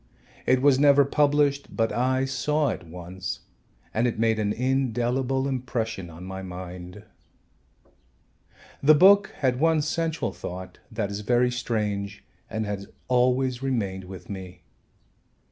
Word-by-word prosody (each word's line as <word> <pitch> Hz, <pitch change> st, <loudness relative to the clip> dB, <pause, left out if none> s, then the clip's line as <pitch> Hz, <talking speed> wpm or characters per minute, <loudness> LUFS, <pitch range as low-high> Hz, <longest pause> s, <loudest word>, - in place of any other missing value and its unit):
It 130 Hz, 0 st, +3 dB
was 140 Hz, -2 st, +5 dB
never 140 Hz, -1 st, +6 dB
published, 145 Hz, 0 st, +2 dB
but 115 Hz, -1 st, +2 dB
I 130 Hz, +2 st, +1 dB
saw 145 Hz, +3 st, 0 dB
it -, -, -3 dB
once 90 Hz, +2 st, -6 dB, 0.5 s
and 115 Hz, +3 st, +2 dB
it 120 Hz, -, -2 dB
made 110 Hz, 0 st, +2 dB
an 105 Hz, -1 st, +1 dB
indelible 130 Hz, +1 st, 0 dB
impression 120 Hz, -8 st, -3 dB
on 85 Hz, +2 st, -11 dB
my 95 Hz, +1 st, -6 dB
mind. 90 Hz, +1 st, -8 dB, 1.8 s
The 150 Hz, +2 st, +7 dB
book 195 Hz, +5 st, +7 dB
had 130 Hz, -2 st, +2 dB
one 160 Hz, 0 st, +3 dB
central 160 Hz, +1 st, -1 dB
thought 90 Hz, +1 st, -7 dB
that 110 Hz, -2 st, -2 dB
is 100 Hz, -, -4 dB
very 120 Hz, +3 st, +2 dB
strange 105 Hz, -4 st, -2 dB, 0.3 s
and 110 Hz, 0 st, -2 dB
has 100 Hz, -1 st, -4 dB, 0.2 s
always 125 Hz, 0 st, +2 dB
remained 100 Hz, -8 st, -2 dB
with 90 Hz, -1 st, -10 dB
me. 90 Hz, -3 st, -8 dB
120 Hz, 130 wpm, -26 LUFS, 100-135 Hz, 1.8 s, The